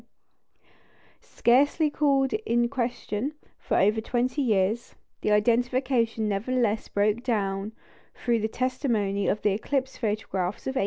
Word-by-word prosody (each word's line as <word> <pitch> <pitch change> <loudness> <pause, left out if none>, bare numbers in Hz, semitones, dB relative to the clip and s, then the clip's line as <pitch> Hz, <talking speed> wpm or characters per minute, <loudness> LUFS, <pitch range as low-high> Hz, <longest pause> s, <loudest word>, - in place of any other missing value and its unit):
Scarcely 290 +5 +2
called 275 -3 +2
in 240 - +1
question 245 +1 -3 0.2
for - - -1
over 210 +3 +3
twenty 250 +5 -1
years, 215 -1 0 0.3
the - - 0
identification 235 +1 +1
nevertheless 220 +1 0
broke 210 +3 +1
down 205 -4 -1 0.4
through 235 -2 0
the 220 - 0
testimony 225 -6 -1
of 210 - 0
the 210 - +3
eclipse 260 +6 -2
photographs 205 -4 -2
of 265 - -2
1898. - - +1
235 Hz, 120 wpm, -26 LUFS, 210-255 Hz, 0.4 s, over